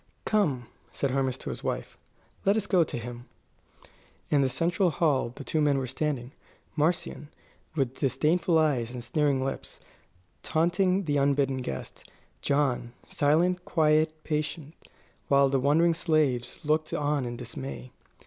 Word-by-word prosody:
"Come," 150 - +1 0.3
said 140 - -1
Hermas 130 -1 0
to - - -6
his - - -8
wife, - - -3 0.5
"let 200 +2 +3
us 215 - 0
go 180 -4 +4
to 150 - -5
him." 120 +1 -7 1.1
In 145 - +4
the 135 - +2
central 175 +7 +1
hall 145 -6 +1
the 140 - -8
two 155 +3 0
men 145 -2 +3
were 135 - -1
standing; 130 -1 -3 0.4
Marcion, 155 -1 -1 0.5
with 135 -4 -1
disdainful 155 +6 +2
eyes 130 -7 +1
and 120 - -6
sneering 135 +1 +1
lips, 135 - -5 0.6
taunting 180 +4 +1
the 145 -4 0
unbidden 140 -1 +2
guest; 70 - -6 0.3
John, 135 -4 0
silent, 175 +5 +2
quiet, 155 -1 +2
patient, 155 0 -3 0.5
while 140 -1 +4
the 135 0 +2
wondering 160 +5 +3
slaves 150 -8 0
looked 155 +1 +1
on 145 -1 0
in 120 -1 -4
dismay. 125 +1 -7
145 Hz, 140 wpm, -28 LUFS, 130-160 Hz, 1.1 s, go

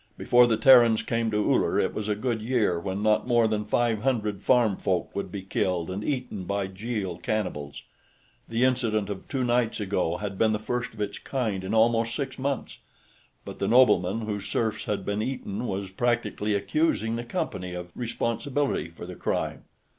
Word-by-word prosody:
Before 120 0 +5
the 115 -2 +2
Terrans 120 -2 +6
came 115 -1 0
to 105 - -1 0.2
Uller, - - +2
it - - +1
was 110 0 -3
a 105 - +1
good 115 0 -2
year 110 -7 +1
when 95 +3 -3
not 110 +2 +2
more 120 -2 +4
than 105 -1 -1
five 115 0 +1
hundred 110 -6 -1
farm 120 -5 +3
folk 90 -2 -1
would 100 - -3
be 100 -2 -5
killed 90 -2 -1
and 100 +3 -4
eaten 125 -8 -3
by 100 +1 -1
Jeel 95 -2 -4
cannibals. 75 -10 -3 0.7
The 115 +2 +1
incident 115 -5 +1
of 95 - -7
two 135 -2 -1
nights 120 -2 +1
ago 95 -4 -1
had 100 -1 -5
been 110 -1 +3
the - - +1
first 120 +2 -3
of 105 - -7
its 100 -1 -3
kind 110 -8 -2
in 95 +4 -2
almost 115 0 +3
six 135 -2 -4
months, 140 -1 -3 0.7
but - - -8
the - - 0
nobleman 115 -5 +4
whose 105 -2 -4
serfs 110 -2 -1
had 100 -2 -2
been 100 +1 -1
eaten 120 -2 -3
was 95 0 -3
practically 115 -1 0
accusing 110 +2 0
the 120 - -3
Company 90 -6 -4
of 90 0 -7
responsibility 125 - -1
for 85 +1 -10
the 90 - -7
crime. - - -3
110 Hz, 185 wpm, -26 LUFS, 100-120 Hz, 0.7 s, Terrans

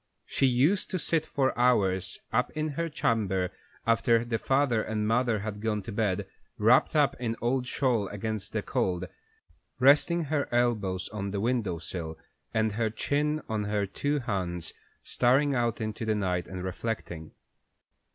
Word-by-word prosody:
She 135 - +2
used 140 +11 +3
to 185 - -1
sit 160 -2 +1
for 135 -2 0
hours 100 -7 +2 0.2
up 125 +2 +2
in 155 0 0
her 165 +3 -2
chamber 95 - 0 0.3
after 115 0 +3
her 115 -1 -1
father 135 -4 +2
and 105 -1 -2
mother 115 -2 +2
had 105 -1 -5
gone 105 -2 -1
to 110 - -6
bed, 100 -3 0 0.3
wrapped 115 +8 +4
up 145 -4 +3
in 115 -2 -1
an - - -10
old 125 +1 0
shawl 125 -7 +1
against 105 0 -4
the 110 -2 -2
cold, 95 -9 -1 0.7
resting 145 +6 +5
her 150 -1 -1
elbows 110 -7 +1
on 100 -1 -4
the 100 0 -2
window 110 -5 0
sill 80 -1 -5 0.3
and 110 -1 +1
her 110 +1 0
chin 150 +7 -1
on 110 -2 -2
her 105 -1 0
two 145 +9 -1
hands, 90 - -3 0.3
staring 135 +4 +3
out 120 -3 0
into 110 0 -4
the 110 -1 +1
night, 90 -4 -1
and 95 -1 -6
reflecting. 95 -4 -4
115 Hz, 160 wpm, -28 LUFS, 100-130 Hz, 0.7 s, resting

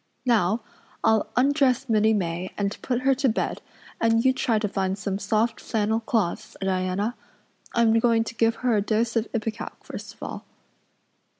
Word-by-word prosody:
Now, 220 -2 +2 0.4
I'll 220 -1 +3
undress 275 -1 +3
Minnie 220 -1 +3
May 175 -1 -2
and 200 0 -1
put 250 -1 -1
her 270 +1 +4
to 265 0 +1
bed 220 - -2 0.4
and 225 +1 +3
you 260 - +5
try 230 -3 +1
to 210 0 0
find 190 -1 -1
some 200 -1 -3
soft 220 +3 0
flannel 220 0 0
cloths, 220 -6 -2
Diana. 190 +3 -1 0.6
I'm 230 -1 +4
going 230 -1 +3
to - - -7
give 230 0 +2
her 240 -3 +4
a 205 - +3
dose 220 +3 0
of 230 0 +1
ipecac 220 -1 -4
first - - -8
of - - -12
all." - - -6
225 Hz, 170 wpm, -25 LUFS, 205-235 Hz, 0.6 s, you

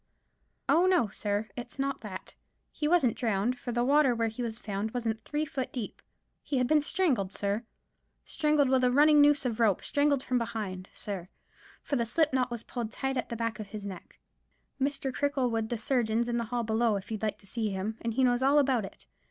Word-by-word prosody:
"Oh, 345 +3 +4
no, 350 - +3
sir; 210 +1 -2
it's 245 +1 -8
not 275 0 -2
that. 195 -4 -8 0.4
He 300 - -2
wasn't 305 -9 +3
drowned; 230 +2 0
for 245 - -4
the 240 0 +1
water 275 -1 +4
where 230 -1 0
he 220 +3 -6
was 230 -2 -3
found 215 +1 -4
wasn't 225 -2 -2
three 295 +4 -2
foot 285 -5 -4
deep. 240 -5 -5 0.4
He 280 - -2
had 250 - +3
been 300 +3 +4
strangled, 275 - +1
sir; 205 +3 -2 0.6
strangled 300 -2 +2
with 260 0 +3
a 250 - +5
running 295 +2 +6
noose 290 -1 +4
of 235 -2 -1
rope; 215 -5 +3
strangled 285 -2 +2
from 250 -1 +1
behind, 200 -5 -4
sir, 190 -3 -5 0.5
for 280 - -1
the 235 - +1
slip 310 +3 +2
knot 255 -1 +2
was 235 -2 -5
pulled 235 -3 -5
tight 270 +4 -2
at 250 - -2
the 235 - -3
back 230 -1 -2
of 215 - -5
his 205 0 -7
neck. 190 -3 -9 0.6
Mr. 275 -1 -1
Cricklewood 250 -6 0
the 240 - -1
surgeon's 235 -1 +1
in 240 0 0
the 235 - -2
hall 240 +1 -2
below, 220 0 +2
if 200 +2 -6
you'd 215 - -3
like 215 -1 -1
to - - -17
see 220 +1 -2
him; 200 +3 -3
and 230 -1 -2
he 265 - +3
knows 245 0 +3
all 275 +2 +4
about 260 -7 +3
it. - - -12
240 Hz, 215 wpm, -29 LUFS, 220-275 Hz, 0.6 s, running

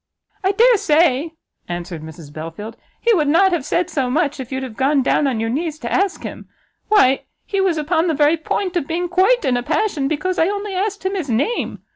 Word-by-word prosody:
"I 385 +1 +2
dare 470 +3 +5
say," 315 -2 +2 0.3
answered 175 -2 -5
Mrs 155 -1 -11
Belfield, 165 +8 -7 0.2
"he 470 - +3
would 310 -7 +2
not 345 +6 +4
have 340 -6 0
said 350 +5 0
so 270 -7 -1
much 290 +1 0
if 255 -1 -7
you'd 265 0 -3
have 250 -4 -7
gone 270 +2 +2
down 285 +2 +2
on 250 -5 -1
your 225 0 -1
knees 310 +3 -2
to 240 -6 -6
ask 390 -1 0
him. - - -8 0.4
Why 275 - +4 0.2
he 395 -1 -1
was 370 -4 +1
upon 320 +3 +1
the 320 - +1
very 295 +2 +4
point 365 +4 -2
of 335 -5 -1
being 345 +2 -1
quite 380 +7 +3
in 255 -2 +2
a - - -1
passion 300 - 0
because 315 +5 -1
I 325 - +4
only 405 0 -3
asked 400 +1 -2
him 380 - 0
his 350 -8 -3
name! 280 - -1
310 Hz, 220 wpm, -19 LUFS, 260-375 Hz, 0.4 s, dare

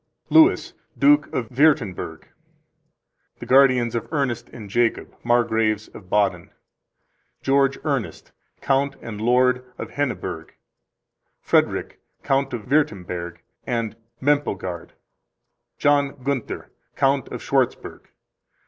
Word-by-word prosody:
Louis, 320 +4 +5 0.2
Duke 290 +1 +4
of 115 -4 -3
Wuerttemberg. 120 - +1 1.1
The - - -9
guardians 130 -3 +4
of 115 +3 -4
Ernest 125 -6 -2
and 110 -4 -10
Jacob, 115 +3 0
Margraves 110 -3 +1
of 90 -3 -13
Baden. 95 -4 +1 0.9
George 135 0 +2
Ernest, 140 -6 -3 0.3
Count 140 +1 +1
and 105 -2 -7
Lord 125 +2 +3
of - - -7
Henneburg. 145 -3 -4 0.9
Frederick, - - 0 0.2
Count 135 0 +1
of 120 -4 -5
Wuerttemberg 90 - -1 0.3
and 115 -3 -2 0.2
Moempelgard. 100 - -1 0.8
John 145 -1 +2
Gunther, 135 -3 -3 0.2
Count 135 -1 +1
of - - -7
Schwartzburg. - - -1
125 Hz, 100 wpm, -23 LUFS, 110-140 Hz, 1.1 s, Louis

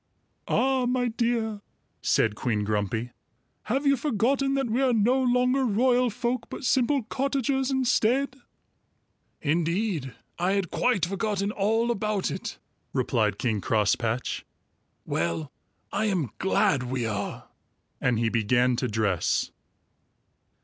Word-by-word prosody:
"Ah, 260 -1 +2
my 245 0 +1
dear!" 225 -2 -1 0.4
said 110 - +2
Queen 105 -1 -1
Grumpy, 105 +3 -1 0.5
"have 270 +7 -1
you 280 0 +5
forgotten 270 +1 +1
that 270 -2 0
we 235 +4 0
are 260 -2 +3
no 240 +4 +3
longer 250 +1 +2
royal 245 +2 +3
folk 240 +3 -2
but - - -7
simple 260 +1 +2
cottagers 270 +1 0
instead?" 265 0 +1 1.1
"Indeed, 165 - 0 0.2
I 180 +3 +2
had 195 -4 -1
quite 245 -9 +2
forgotten 200 +1 -1
all 225 +4 +1
about 210 -3 -1
it," - - -5 0.4
replied 105 -3 +1
King 110 -4 -1
Crosspatch. 110 +4 0 0.6
"Well, 85 -3 -2 0.4
I 215 +2 0
am 180 - 0
glad 145 -7 +2
we 125 -1 -2
are," 105 -2 -4 0.5
and 125 -2 +2
he 115 0 +1
began 120 +3 +2
to 125 - 0
dress. 105 -6 0
210 Hz, 120 wpm, -26 LUFS, -, 1.1 s, you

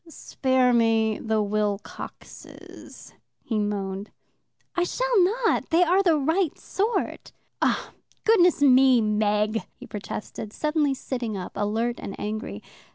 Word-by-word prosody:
"Spare 260 -5 +1
me 225 -2 +2
the 220 -1 0
Wilcoxes," 205 0 -6 0.3
he 220 -3 -1
moaned. 200 -1 -3 0.7
"I 355 - +2
shall - - +2
not. 450 +5 +1
They 335 +2 +4
are 360 +3 +3
the 340 -5 +3
right 320 +4 0
sort." 425 +4 -2 0.3
"Oh, - - 0 0.3
goodness 360 -9 +4
me, 260 -2 +6
Meg!" 210 0 +1
he - - -12
protested, 210 +1 -7
suddenly 300 -2 0
sitting 240 -5 -4
up, 185 - -6
alert 225 +4 -1
and 195 - -7
angry. 210 - -5
235 Hz, 120 wpm, -25 LUFS, 210-325 Hz, 0.7 s, me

